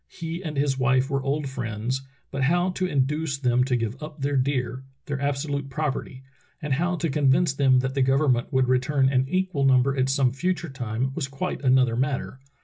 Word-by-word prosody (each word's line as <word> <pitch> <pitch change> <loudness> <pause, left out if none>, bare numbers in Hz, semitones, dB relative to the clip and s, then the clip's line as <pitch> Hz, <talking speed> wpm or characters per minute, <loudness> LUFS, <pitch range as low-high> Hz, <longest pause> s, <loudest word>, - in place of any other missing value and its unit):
He 170 +2 -6
and 155 -4 -5
his 140 -1 +1
wife 130 +1 +2
were 135 -1 0
old 140 +2 -1
friends, 120 0 -3 0.3
but 140 - -3
how 175 +5 +2
to 185 0 -1
induce 145 0 0
them 125 -2 +2
to 130 -1 0
give 115 +3 -3
up 150 0 -8
their 140 +1 -1
deer 130 -1 -1
— 135 - -45
their 140 -1 -4
absolute 140 0 -2
property 135 -2 -3 0.2
— - - -37
and 150 -2 -2
how 175 +6 0
to 165 0 -1
convince 140 +3 +3
them 135 -2 +4
that 130 0 -2
the 135 - 0
govern 135 +2 +3
ment 120 +2 -1
would 130 -2 +2
return 130 +2 +2
an 130 -1 +1
equal 185 -5 0
number 135 0 +4
at 130 0 +1
some 135 -2 +2
future 175 +4 -2
time 125 0 -3
was 140 -2 -3
quite 135 +7 -4
another 130 -3 +3
matter. 130 0 -2
135 Hz, 210 wpm, -25 LUFS, 130-150 Hz, 0.3 s, them